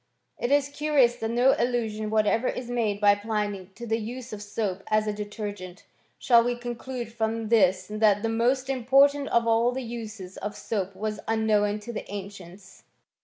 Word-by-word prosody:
* - - -42
It 240 - 0
is 285 -1 +4
curious 285 -5 +2
that 225 -2 -3
no 245 +3 +4
allusion 220 -3 -1
whatever 220 +3 +2
is 245 -1 -4
made 220 -4 0
by 205 -1 +6
Pliny 205 -2 -3
to 240 - -8
the 225 0 0
use 235 +2 -7
of 205 - -6
soap 205 -2 -3
as 215 0 +2
a 210 - -1
detergent; 205 -3 -6 0.3
shall 235 -2 +5
we 245 +1 0
con 240 0 -4
elude 240 -1 -6
from 225 -1 -2
this 190 -5 +3
that 210 -1 +2
the - - +1
most 245 +4 +1
important 275 +2 +3
of 235 0 +2
all 230 +1 +3
the 260 +1 -4
uses 220 -5 -7
of 205 0 -5
soap 200 -3 -3
was 210 +1 -3
unknown 215 -2 +2
to 235 +3 -7
the 210 - -6
ancients? 195 -2 -9
220 Hz, 185 wpm, -26 LUFS, 205-240 Hz, 0.3 s, by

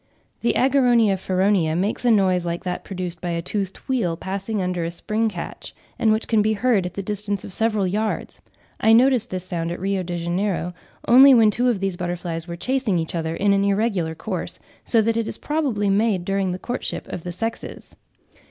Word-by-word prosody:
The 235 - +1
Ageronia 245 -6 +4
feronia 185 -3 +1
makes 200 +7 -1
a - - +5
noise 190 -5 +3
like 170 0 -3
that 180 -1 -4
produced 180 -2 -5
by 175 - -3
a 170 0 -1
toothed 195 +1 -3
wheel 205 -11 0
passing 195 +4 -3
under 180 -2 -1
a 165 - -2
spring 215 +6 -1
catch, 180 -5 -7 0.2
and 220 - +3
which 220 +1 0
can 220 -2 +3
be 215 +1 +2
heard 215 -4 +1
at 180 - -10
the 195 - -4
distance 205 0 -3
of 195 - -9
several 215 -2 +1
yards: 210 +4 -2 0.4
I 220 - +5
noticed 245 0 +4
this 185 -1 -4
sound 170 -2 -3
at 175 - -5
Rio 195 +1 -1
de 175 -1 -4
Janeiro, 175 +1 -1 0.3
only 265 +3 +8
when 220 -3 +5
two 245 +4 +1
of 215 -6 -1
these 195 -2 -2
butterflies 175 -1 -4
were 170 - -5
chasing 245 +1 0
each 160 -1 -3
other 165 -1 -2
in 200 +2 +2
an 195 0 +2
irregular 200 -5 0
course, - - -5 0.3
so 225 -2 +3
that 230 +1 +1
it 230 -1 -1
is - - -4
probably 275 -10 -1
made 200 -2 +1
during 195 -1 0
the 180 - -3
courtship 245 +6 -4
of - - -5
the 180 - -6
sexes. 225 +6 -5
195 Hz, 205 wpm, -22 LUFS, 180-225 Hz, 0.4 s, only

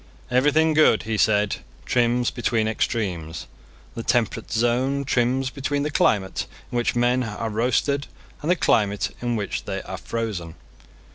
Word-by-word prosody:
Everything 150 +5 +4
good, 155 -7 +4
he 110 0 -2
said, 105 -1 +2 0.3
trims 120 0 +2
between 115 -3 0
extremes. 95 -8 -2 0.5
The 115 - -5
temperate 115 -1 0
zone 125 +5 +1
trims 130 +1 +1
between 140 +1 -2
the 150 - -2
climate 95 -8 +1 0.2
in - - -5
which 120 0 +1
men 120 +1 +2
are 110 -1 -3
roasted 130 +5 +1 0.3
and 155 - -3
the 180 - +5
climate 105 - +1
in 120 -1 -1
which 105 -2 -3
they - - -4
are - - -6
frozen. 105 -8 -4
120 Hz, 145 wpm, -24 LUFS, 110-130 Hz, 0.5 s, the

